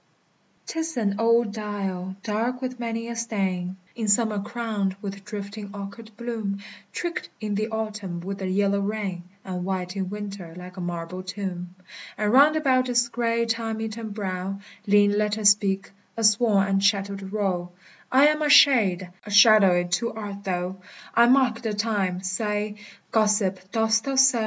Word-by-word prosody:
'T 325 - -4
is 320 -3 -3
an 205 -4 +1
old 230 -1 +3
dial, 195 -3 -4
dark 230 +4 -1
with 255 -1 -5
many 230 -1 -3
a 235 - -5
stain; 190 -5 -2 0.2
In 225 -2 -3
summer 210 0 +2
crowned 210 -3 -2
with 200 -1 -7
drifting 205 0 -7
orchard 200 +3 -8
bloom, 225 -4 -3 0.3
Tricked 345 0 -4
in 215 -2 -3
the 215 +2 0
autumn 210 -5 -4
with 195 +3 -5
the 190 - -3
yellow 200 +1 +1
rain, 200 -3 -3 0.2
And 180 -2 -4
white 185 0 -3
in 190 -2 -2
winter 200 -5 -7
like 180 0 -10
a 185 - -6
marble 175 +1 -4
tomb. 185 -2 -5 0.4
And 210 +1 0
round 290 +4 +7
about 260 -4 +2
its 240 -1 +2
gray, 235 -1 0
time 225 -1 -2
eaten 220 0 -5
brow 195 -2 -4 0.3
Lean 205 0 +5
letters 210 0 +3
speak, 200 -1 +1 0.3
a 225 - +1
worn 210 -5 +3
and 195 0 +1
shattered 200 -1 0
row: 190 -4 -1 0.4
=I 270 +2 +6
am 305 0 0
a 300 - +1
Shade; 210 -12 +6 0.2
a - - -10
Shadowe 200 -4 +6
too 185 +7 -1
art 205 -2 -7
thou: 180 0 -2 0.4
I 235 +1 +6
marke 250 -3 +3
the 220 -3 -2
Time: 200 -4 -1
saye, 210 +2 -2 0.3
Gossip, 205 -4 +1
dost 220 -1 +2
thou 275 -1 -1
soe? 265 -2 +5
205 Hz, 165 wpm, -25 LUFS, 195-230 Hz, 0.4 s, round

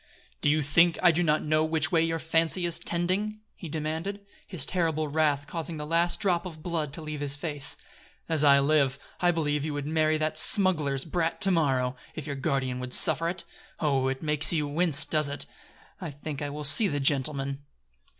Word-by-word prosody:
"Do - - +2
you 150 +1 +2
think 165 +4 +3
I 175 - +7
do 170 +2 0
not 155 -2 +1
know 155 +1 +1
which 160 +2 0
way 165 -2 +3
your 165 0 0
fancy 165 +2 +1
is 170 -1 -2
tending?" 195 +5 -1
he 170 - -9
demanded, 160 +6 -4 0.2
his 165 -8 0
terrible 160 -4 -1
wrath 145 -1 0
causing 160 +1 -5
the 150 - -5
last 170 +2 +1
drop 180 -4 +1
of 155 -3 -11
blood 160 -5 -2
to 160 - -7
leave 155 -1 -5
his 145 -1 -2
face. 145 -2 -1 0.5
"As 160 -2 +1
I 140 -1 +6
live, 140 -2 +2 0.2
I 175 - +2
believe 150 -4 0
you 150 -1 -3
would 145 -1 -4
marry 155 0 +1
that 155 0 -1
smuggler's 155 -9 +3
brat 165 0 -2
to 195 - +5
morrow, 130 -7 +1 0.2
if 155 - -6
your 140 - -4
guardian 135 -3 -2
would 125 0 -4
suffer 160 +2 +6
it! 180 - -4 0.4
Oh 135 -4 +1
it 135 +2 -3
makes 150 -1 +1
you 150 -4 -1
wince, 155 0 +1
does 155 -2 0
it? 145 - -5 0.6
I 175 - -5
think 145 0 -7
I 145 - -3
will 150 +1 -6
see 200 +9 +4
the 145 -6 -2
gentleman." 140 0 0
155 Hz, 200 wpm, -27 LUFS, 145-165 Hz, 0.6 s, I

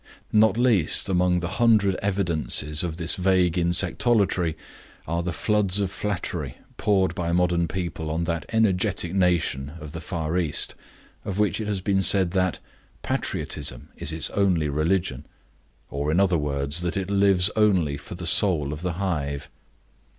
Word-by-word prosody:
Not 110 0 +4
least 110 -8 +3
among 90 -1 +2
the 85 - -2
hundred 110 -4 +4
evidences 85 -6 0
of 85 -2 -4
this 85 -1 -1
vague 90 -2 +2
insectolatry 90 0 +1 0.5
are 85 +1 -1
the 90 +1 -3
floods 100 +3 +1
of 100 -2 -1
flattery 85 -9 -4 0.2
poured 95 -3 +1
by 85 -3 -3
modern 85 -1 +1
people 85 -2 -4
on 80 +2 -1
that 85 -2 -3
energetic 100 -5 +1
nation 85 -7 0
of 75 -2 -9
the 85 +2 -7
Far 85 0 -2
East 80 -4 -1 0.5
of 100 - -5
which 105 -1 +1
it 105 - -4
has 100 -3 -2
been 95 0 +1
said 95 -2 +4
that 95 -2 0 0.5
"Patriotism 70 -4 -2
is 75 - -2
its 80 -1 -2
only 90 -7 +1
religion"; 75 -2 -1 0.6
or, 70 +1 -2
in 85 - +2
other 95 -2 +3
words, 70 +1 -1
that 85 +1 -2
it 95 0 -3
lives 100 -1 +5
only 95 -9 +2
for 75 +4 -9
the 85 0 -7
Soul 80 -5 +3
of 75 - -7
the 90 -1 -2
Hive. 75 -7 -3
90 Hz, 160 wpm, -24 LUFS, 80-95 Hz, 0.6 s, lives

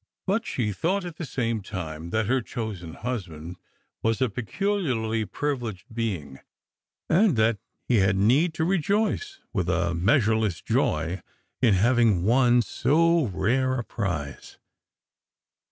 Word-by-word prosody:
But 205 +4 0
she 110 -5 -1
thought 180 - -1
at 170 -3 -7
the 165 - -5
same 115 -5 -1
time 85 -5 -6
that 110 +3 0
her 130 +4 +1
chosen 105 -9 -6
husband 90 -8 -5 0.4
was 115 -1 +1
a 130 -4 +1
peculiarly 120 - -1
privileged 115 -4 -4
being, 90 - -3 0.7
and 185 - +4
that 110 -1 +2 0.3
he 120 - +3
had 95 -1 +3
need 135 - +3
to 160 - 0
rejoice 210 - 0
with 95 -5 -1
a 85 -2 +1
measureless 110 - +2
joy 80 +4 0 0.4
in 115 -6 +5
having 110 -3 +3
won 120 +2 +4
so 165 +2 +2
rare 130 +7 +1
a 120 - -2
prize. 80 - -4
115 Hz, 130 wpm, -26 LUFS, 95-140 Hz, 0.7 s, in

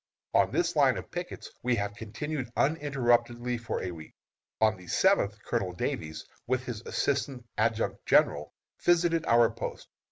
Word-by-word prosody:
On - - +4
this - - 0
line - - +4
of - - -8
pickets - - -6
we 125 0 +2
have 100 -1 -2
continued 120 +5 -5
uninterruptedly 125 -5 +1
for 120 - -3
a 90 - -3
week. 80 -2 -11 0.4
On 110 0 +4
the 90 -1 -14
seventh, 105 - +3
Colonel 90 -2 -1
Davies, 80 -2 -3 0.2
with 130 +1 0
his 115 -4 -5
assistant 135 -3 -1
adjutant 110 +1 0
general, 75 +1 +3 0.3
visited 170 -1 +3
our 115 0 +5
post. 115 - -6
120 Hz, 150 wpm, -29 LUFS, 105-135 Hz, 0.4 s, our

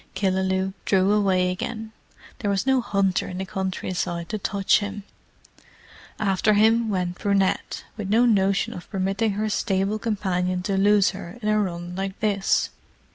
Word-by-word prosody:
Killaloe 190 0 0
drew 190 0 +3
away 190 -3 +2
again: 220 +4 -5 0.5
there 205 - -1
was 195 +2 0
no 265 -1 +3
hunter 195 -5 0
in 180 - -6
the 190 - -3
country 190 0 -3
side 170 -1 -3
to 215 - -3
touch 200 0 +2
him. 205 0 -5 1.1
After 210 0 +2
him 225 +2 +4
went 180 -3 -2
Brunette, 200 -2 0
with 205 -3 -4
no 230 +4 +4
notion 195 -4 +2
of 180 - -10
permitting 195 +2 0
her 215 +2 -1
stable 200 0 0
companion 185 -5 -1
to 195 +1 -1
lose 200 0 +4
her 190 +1 -9
in 210 - +1
a 215 0 +3
run 175 -3 -3
like 195 0 -4
this. 200 -2 +1
195 Hz, 160 wpm, -24 LUFS, 185-210 Hz, 1.1 s, him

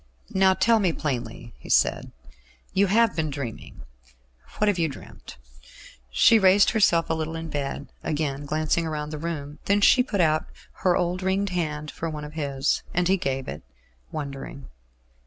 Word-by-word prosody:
"Now 190 0 +4
tell 230 +2 +3
me 190 -4 +2
plainly," 120 -5 -4
he - - -13
said. - - +2 0.6
"You 195 +1 +3
have 225 +2 +3
been 160 -2 -1
dreaming. 135 -5 -7 0.7
What 210 - +2
have 200 -3 +2
you 165 -2 +1
dreamt?" 135 - -12 0.7
She 65 - +5
raised 195 +1 +5
herself 185 -7 +3
a - - 0
little 160 0 -3
in 165 -1 -6
bed, 140 0 -4
again 145 -2 -2
glancing 155 +2 0
round 150 -1 -4
the 155 - -5
room; 150 -2 -5
then 200 +1 +3
she 250 +5 +6
put 210 -6 -2
out 155 -2 +2 0.3
her 180 -2 +3
old 180 +1 -1
ringed 190 +2 0
hand 150 -4 -3
for 165 - -4
one 150 -1 -6
of 150 - -10
his, 140 -3 -1
and 180 0 +2
he 190 - +4
gave 135 -7 -3
it, 75 - -6 0.5
wondering. 140 - -7
160 Hz, 170 wpm, -25 LUFS, 145-190 Hz, 0.7 s, she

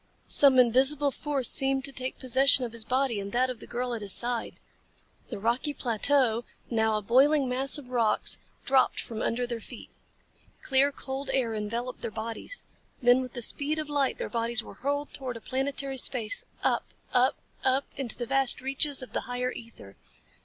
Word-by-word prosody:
Some 275 -2 +6
invisible 265 +4 +5
force 275 -2 -2
seemed 270 0 +3
to 280 - 0
take 260 -1 -4
possession 260 0 +4
of 235 - -7
his 230 -1 -3
body 255 -2 0
and 200 0 -6
that 255 +1 +2
of 245 - -9
the - - -8
girl 245 0 -3
at 230 - -4
his 200 -2 +1
side. 240 +3 +2 0.7
The - - -5
rocky 240 +8 -1
plateau, 240 -1 +2 0.3
now 220 -1 +1
a 210 - -5
boiling 270 +6 +4
mass 265 +4 0
of 270 -4 -11
rocks, 230 -4 0 0.3
dropped 265 -1 +2
from 225 -1 -5
under 245 +2 -1
their 240 -1 -5
feet. 230 +2 -11 0.7
Clear, 270 +1 +3
cold 270 0 -6
air 240 -4 0
enveloped 230 +4 -4
their - - -3
bodies. 225 - -4 0.4
Then 245 +1 +4
with 255 -2 -7
the 240 - 0
speed 295 +6 +1
of 305 -1 -4
light 280 -2 0
their - - -4
bodies 235 0 -1
were - - -11
hurled 285 +6 -3
through 255 -3 -6
planetary 270 +1 -3
space, 230 -4 -2 0.2
up, - - +1 0.3
up, 255 +1 +3 0.3
up 265 +1 +1
into 265 -4 -3
the 240 - -3
vast 270 +1 +3
reaches 275 +1 -1
of 255 - -12
the - - -1
higher 250 0 -2
ether. 230 - -12
255 Hz, 180 wpm, -27 LUFS, 235-270 Hz, 0.7 s, Some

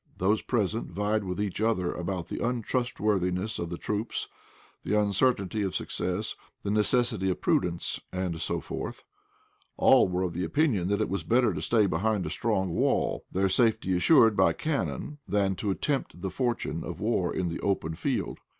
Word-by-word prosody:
Those 105 +4 +2
present 110 -2 -1
vied 105 +3 -1
with 90 0 -4
each 105 -1 -2
other 100 -6 +1
about 90 -1 -4
the - - -4
untrustworthiness 105 -5 0
of 85 - -3
the 85 - -4
troops, 105 +5 -2 0.6
the 105 +1 +2
uncertainty 105 0 +1
of 95 -4 -2
success, - - -2 0.3
the 100 - -1
necessity 110 -2 +2
of 90 - -1
prudence, 85 -1 0
and 90 -3 -3
so - - -1
forth. - - -6 0.7
All - - +6
were 90 0 -1
of 85 -2 -3
opinion 90 - +1
that 100 +1 +1
it - - 0
was 100 +2 -2
better 120 -3 +3
to 75 - -4
stay 110 +5 +3
behind 100 +2 0
a - - -4
strong 95 -5 0
wall, - - 0
their 95 +1 +2
safety 110 -2 +2
assured 110 - +5
by - - +4
cannon, 150 -1 -3
than 100 -2 +1
to 105 - -1
tempt 140 - -2
the 95 +1 -4
fortune 120 -3 -2
of - - -6
war - - 0
in 90 -2 -1
the 85 - -4
open 95 -5 -1
field. - - -2
100 Hz, 170 wpm, -28 LUFS, 90-110 Hz, 0.7 s, All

